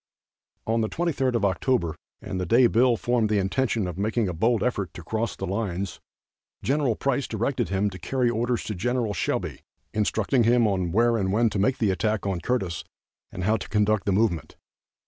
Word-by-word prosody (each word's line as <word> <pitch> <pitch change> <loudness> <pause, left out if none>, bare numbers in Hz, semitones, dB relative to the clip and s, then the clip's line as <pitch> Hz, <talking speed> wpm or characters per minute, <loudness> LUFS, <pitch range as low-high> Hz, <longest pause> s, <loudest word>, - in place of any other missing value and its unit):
On 115 +1 +1
the 110 - 0
23d 140 -7 0
of 115 - +2
October, 95 -3 0 0.3
and 95 -3 -3
the - - -1
day 120 +6 +5
Bill 120 +1 +4
formed 120 -2 +1
the 105 - +2
intention 110 +2 0
of 90 0 -5
making 110 +1 0
a 90 - -2
bold 115 +7 +1
effort 100 -7 -2
to 85 - -8
cross 110 +5 -2
the 95 - -4
lines, 95 -1 -3 0.6
Gen. 135 -4 +1
Price 140 +2 -1
directed 115 -2 -1
him 100 +2 +1
to 95 - -9
carry 125 +7 0
orders 120 +1 0
to 110 - -4
Gen. 115 +2 -1
Shelby 90 - -2 0.3
instructing 110 +4 +1
him 105 -7 +2
where 115 +4 +3
and 95 -3 0
when 110 +2 +2
to 100 - -2
make 130 +7 +2
the 105 -4 +2
attack 105 +2 -1
on 95 -3 -1
Curtis, 95 -6 -1 0.5
and 90 - -5
how 110 +4 +2
to 100 - -8
conduct 105 0 +2
the - - +3
movement. 95 -4 0
110 Hz, 190 wpm, -25 LUFS, 95-120 Hz, 0.6 s, day